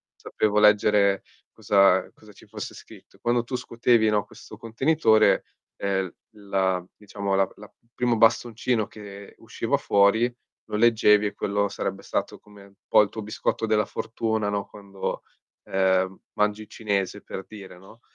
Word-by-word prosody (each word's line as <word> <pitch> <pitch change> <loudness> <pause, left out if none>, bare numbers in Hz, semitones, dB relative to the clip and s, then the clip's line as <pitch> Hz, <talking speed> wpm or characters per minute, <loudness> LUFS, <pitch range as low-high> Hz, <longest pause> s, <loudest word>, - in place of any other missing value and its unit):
sapevo 105 -1 0
leggere 105 -1 +4 0.3
cosa 100 -2 +3
cosa 105 -1 -18
ci - - -18
fosse - - -7
scritto. - - -16
Quando 120 0 +1
tu 125 +1 -5
scuotevi, 115 -2 +2
no, 105 -1 +1
questo 110 - -14
contenitore, 115 -1 +2 0.3
ehm, 95 -2 -2 0.2
la 95 -3 -1
diciamo 100 -1 -3
la 95 -1 +2
la 105 -1 -14 0.2
primo 120 -1 +1
bastoncino 115 0 +2
che 100 -1 -12
usciva - - -2
fuori, 110 +5 +3 0.4
lo - - -3
leggevi 105 -2 +4
e 100 - -5
quello 100 0 -1
sarebbe - - -4
stato - - -3
come 105 -1 -17
un 100 - -20
po' - - +6
il 105 - 0
tuo 110 - -7
biscotto 110 +1 -2
della 105 -1 +2
fortuna, 110 -2 -2
no, 100 -1 -3
quando, 100 -2 -6 0.4
ehm, 95 0 +1
mangi 105 +1 -1
cinese, 100 -4 -2
per 95 - -7
dire, 95 -4 -11
no? 110 +5 -17
105 Hz, 150 wpm, -25 LUFS, 100-110 Hz, 0.4 s, po